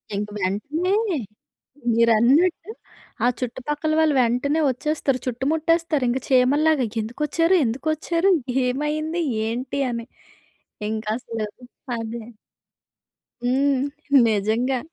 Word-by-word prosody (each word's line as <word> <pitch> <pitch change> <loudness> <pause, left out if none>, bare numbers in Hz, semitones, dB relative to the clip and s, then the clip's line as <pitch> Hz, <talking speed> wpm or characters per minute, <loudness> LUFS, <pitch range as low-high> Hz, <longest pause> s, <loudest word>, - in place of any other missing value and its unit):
ఇంక 205 +1 -2
వెంటనే 290 - -1 1.0
మీరన్నట్టు 235 - +3 0.5
ఆ - - +5
చుట్టుపక్కల 295 +5 -2
వాళ్ళు 310 -2 +3
వెంటనే 250 +6 +1
ఒచ్చేస్తారు. 275 0 -1
చుట్టుముట్టేస్తారింక 300 0 +1
చీమల్లాగా. 275 +2 +3 0.2
ఎందుకొచ్చారు? 300 - +1
ఎందుకొచ్చారు? 315 +9 0 0.3
ఏమైంది? 305 +6 -1 0.3
ఏంటి? 255 +4 -3
అని. 235 0 -5 0.8
ఇంకసలు 220 0 -3 0.5
అదే. 225 0 -5 1.2
హ్మ్. 265 +2 +2 0.4
నిజంగా. 225 +5 +1
265 Hz, 75 wpm, -23 LUFS, 235-310 Hz, 1.2 s, ఆ